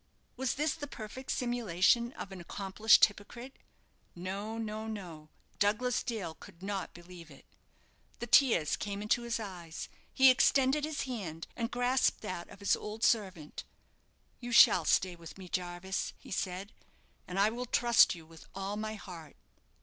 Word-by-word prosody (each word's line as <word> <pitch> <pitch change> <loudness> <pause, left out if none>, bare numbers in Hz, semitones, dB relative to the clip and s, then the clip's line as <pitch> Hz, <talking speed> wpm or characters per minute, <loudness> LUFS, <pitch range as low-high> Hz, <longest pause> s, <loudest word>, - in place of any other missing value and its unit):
Was 260 0 -1
this 300 +1 0
the 295 -3 -7
perfect 255 +1 -9
simulation 235 -1 +2
of 195 - -8
an 190 -2 -8
accomplished 200 +4 +4
hypocrite? 235 +5 -10 0.6
No, 195 +5 -5
no, 220 0 -4
no; 175 -8 -8 0.3
Douglas 215 +5 +1
Dale 215 -9 -4
could 170 +2 -15
not 195 -1 -3
believe 175 -1 -12
it. 140 - -16 0.7
The - - -5
tears 225 - +4
came 205 0 -4
into 215 +3 +1
his 235 -1 -2
eyes; 175 -6 -7 0.2
he 265 0 +7
extended 270 +3 +3
his 310 -2 -3
hand, 190 - -5
and 230 -1 -2
grasped 245 +1 +1
that 185 -5 -6
of - - -14
his 200 - +3
old 215 +1 -7
servant. 185 -9 0 0.8
"You 245 -1 -6
shall 220 -7 +7
stay 180 -1 +2
with 170 +1 -12
me, 190 -1 -10
Jarvis," 180 +1 -3
he - - -14
said; 185 +2 -3 0.5
"and 180 - -5
I 205 +2 +4
will 245 +2 -5
trust 235 -4 +5
you 165 -2 -12
with 165 0 -15
all 195 +1 -4
my 215 0 -4
heart." 170 -7 -10
205 Hz, 155 wpm, -32 LUFS, 180-240 Hz, 0.8 s, he